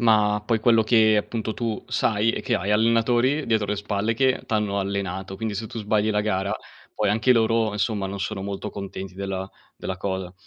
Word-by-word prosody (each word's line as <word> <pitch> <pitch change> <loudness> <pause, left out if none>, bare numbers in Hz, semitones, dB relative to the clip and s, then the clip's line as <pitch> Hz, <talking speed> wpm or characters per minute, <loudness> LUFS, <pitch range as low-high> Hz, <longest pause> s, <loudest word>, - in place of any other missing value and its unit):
Ma 105 -2 +4
poi 115 -1 +1
quello 115 -1 +5
che 110 -1 +5
appunto 110 +1 -2
tu 115 -2 -3
sai, 110 0 +2
è - - -3
che 125 -3 0
hai 100 0 -1
allenatori 120 +6 +3
dietro 110 -3 +1
le 105 - 0
spalle 105 +2 -1
che 130 +1 +2
t'hanno 105 -2 0
allenato, 95 -1 -3
quindi 110 0 -3
se 110 +3 -4
tu 115 - -7
sbagli 105 +1 +1
la 105 0 +1
gara, 100 0 -1 0.4
poi 105 -1 0
anche 110 +4 +4
loro, 115 -2 +2
insomma, 105 -1 -1
non 100 0 -5
sono 95 0 -3
molto 100 +1 -4
contenti 95 -2 -7
della 95 0 -4 0.3
della 95 - -4
cosa, 95 -1 -3
105 Hz, 195 wpm, -24 LUFS, 100-115 Hz, 0.4 s, quello